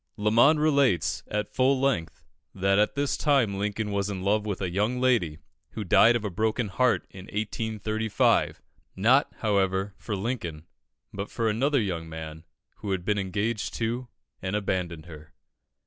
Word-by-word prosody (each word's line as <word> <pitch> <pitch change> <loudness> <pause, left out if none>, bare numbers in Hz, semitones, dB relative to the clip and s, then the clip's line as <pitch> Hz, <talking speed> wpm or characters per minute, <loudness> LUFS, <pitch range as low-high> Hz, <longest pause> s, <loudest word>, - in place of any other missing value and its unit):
Lamon 115 +9 +4
relates, 130 - +2
at 105 0 -3
full 130 +1 +3
length, 130 -12 -1 0.3
that 95 +1 +2
at 105 - +2
this 140 0 0
time 125 -10 +2
Lincoln 105 +1 -2
was 100 0 -1
in 95 -2 -4
love 105 +2 +1
with 100 -3 -2
a 95 -3 -2
young 105 +7 0
lady, 115 -12 +2 0.4
who 110 - -4
died 110 +5 +5
of 115 -2 -2
a 105 - -2
broken 110 +3 0
heart 125 +5 +1
in 95 -1 -10
1835, 110 0 0 0.3
not, 125 +9 +3
however, 100 -2 +1
for 105 - -4
Lincoln, 95 -8 -4 0.5
but 100 +1 -5
for 115 -1 -1
another 135 +6 +2
young 85 -6 -3
man 80 0 -8 0.3
who 105 - -6
had 95 -2 -2
been 105 -1 +1
engaged 100 +3 -2
to, 120 +2 -2 0.3
and 95 +2 -2
abandoned 90 -6 -2
her. 75 -2 -13
105 Hz, 160 wpm, -27 LUFS, 95-115 Hz, 0.5 s, died